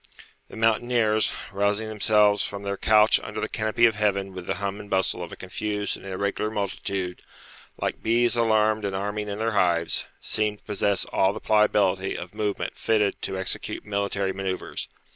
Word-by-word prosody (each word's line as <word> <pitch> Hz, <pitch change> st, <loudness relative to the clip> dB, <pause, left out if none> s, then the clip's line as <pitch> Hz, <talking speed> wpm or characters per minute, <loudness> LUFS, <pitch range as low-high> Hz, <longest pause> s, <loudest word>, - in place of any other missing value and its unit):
The -, -, -12 dB
mountaineers, 115 Hz, -1 st, +2 dB, 0.2 s
rousing 100 Hz, +2 st, 0 dB
themselves 105 Hz, -1 st, +3 dB
from 100 Hz, 0 st, -5 dB
their 100 Hz, 0 st, -2 dB
couch 105 Hz, +2 st, +5 dB
under 105 Hz, +1 st, -6 dB
the -, -, -1 dB
canopy 110 Hz, +2 st, +2 dB
of 115 Hz, -, +4 dB
heaven 100 Hz, -2 st, 0 dB
with 90 Hz, -1 st, -8 dB
the -, -, 0 dB
hum 100 Hz, 0 st, -3 dB
and 105 Hz, -1 st, -10 dB
bustle 95 Hz, -1 st, +1 dB
of 85 Hz, -, -6 dB
a -, -, -7 dB
confused 105 Hz, +2 st, -3 dB
and -, -, -12 dB
irregular 100 Hz, +2 st, -1 dB
multitude, 100 Hz, -3 st, -3 dB, 0.6 s
like -, -, -3 dB
bees 120 Hz, +2 st, +2 dB
alarmed 110 Hz, -2 st, +2 dB
and 100 Hz, -1 st, -2 dB
arming 105 Hz, +2 st, -3 dB
in 100 Hz, -, -4 dB
their 115 Hz, +1 st, 0 dB
hives, 85 Hz, -5 st, +1 dB
seemed 105 Hz, -1 st, 0 dB
to -, -, -33 dB
possess 100 Hz, -2 st, 0 dB
all 95 Hz, +1 st, +2 dB
the 110 Hz, -, -6 dB
pliability 100 Hz, -3 st, +2 dB
of 90 Hz, +2 st, -8 dB
movement 105 Hz, -1 st, -2 dB
fitted 105 Hz, -3 st, +1 dB
to 95 Hz, -, -3 dB
execute 95 Hz, -1 st, -3 dB
military 100 Hz, -1 st, -1 dB
manoeuvres. 95 Hz, -1 st, -4 dB
105 Hz, 175 wpm, -25 LUFS, 95-110 Hz, 0.6 s, couch